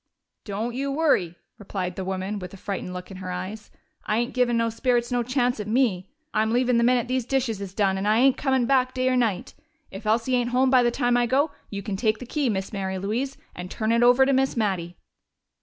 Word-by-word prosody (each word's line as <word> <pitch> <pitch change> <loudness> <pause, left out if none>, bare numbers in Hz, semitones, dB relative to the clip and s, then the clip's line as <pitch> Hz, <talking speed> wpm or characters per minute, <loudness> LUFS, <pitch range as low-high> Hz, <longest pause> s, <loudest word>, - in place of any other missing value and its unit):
"Don't 220 +4 -3
you 275 +2 -2
worry!" 275 - +1 0.2
returned 190 -3 -4
the 190 - -4
woman, 190 +2 -3
with 180 -1 -8
a - - -12
frightened 190 -1 -5
look 180 +1 -7
in 190 - -8
her 185 -1 -6
eyes. 190 +4 -6 0.3
"I 215 - 0
ain't 240 +1 -1
givin' 245 -2 +2
no 230 0 +1
spirits 240 +1 0
no 245 -1 +1
chance 245 0 0
at 210 - -4
me! 215 -6 +1 0.2
I'm 220 0 +1
leavin' 245 0 +2
the - - +3
minute 245 0 +3
these 255 0 0
dishes 245 -4 -1
is 195 -1 -7
done, 195 -2 +1
and 200 - -2
I 215 +1 +4
ain't 260 +2 +5
comin' 265 -3 +1
back 255 0 +2
day 255 0 +1
or 255 - +2
night. 225 -7 0 0.4
If 195 +2 -8
Elsie 230 +4 +1
ain't 240 -1 +1
home 255 +1 +2
by 255 -1 +6
the 240 - +3
time 245 0 +1
I 240 0 +2
go, 280 +5 +2 0.2
you 200 -1 -5
can 200 -1 -3
take 215 0 +1
the 250 - -8
key, 280 +1 -1
Miss 195 0 -3
Mary 190 -1 -3
Louise, 230 +8 -2 0.2
and 180 0 -7
turn 220 +2 -1
it 230 +1 +3
over 245 +2 +6
to 275 - +2
Miss 265 -1 +1
Mattie." 185 -5 -1
230 Hz, 240 wpm, -25 LUFS, 195-255 Hz, 0.4 s, by